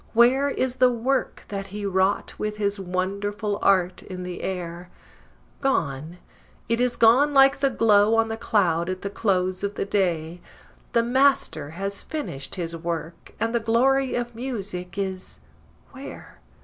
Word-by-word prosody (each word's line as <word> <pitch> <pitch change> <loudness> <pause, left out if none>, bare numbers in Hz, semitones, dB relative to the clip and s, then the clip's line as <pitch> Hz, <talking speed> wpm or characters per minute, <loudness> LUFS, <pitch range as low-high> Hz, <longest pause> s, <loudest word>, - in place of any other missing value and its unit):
Where 255 +5 +4
is 260 -2 -1
the 250 0 +5
work 250 +3 -1
that 195 -1 -4
he 205 +1 -6
wrought 190 +1 +1
with 210 0 -3
his 200 -1 0
wonderful 200 +3 -2
art 185 -2 +2
in 185 -1 -7
the 180 -1 -6
air? 175 -1 -5 0.7
Gone, 160 - -1 0.5
it 230 +1 +1
is 250 -1 +1
gone 265 +6 +5
like 270 0 +6
the 275 0 +3
glow 220 -3 +4
on 225 0 +3
the 225 - -3
cloud 180 -7 +1
at 185 0 -4
the 200 - -3
close 185 -3 0
of 200 0 -2
the - - -2
day! 175 -4 -1 0.5
The 235 -1 +4
Master 245 - +2
has 195 +1 -3
finished 140 - -5
his 170 -3 -4
work, 165 0 -5
and 230 +1 -1
the 235 - +2
glory 255 +4 +2
of 240 0 -3
music 200 -7 -5
is 190 -1 -4 0.5
where? 270 +1 -11
205 Hz, 155 wpm, -24 LUFS, 180-240 Hz, 0.7 s, like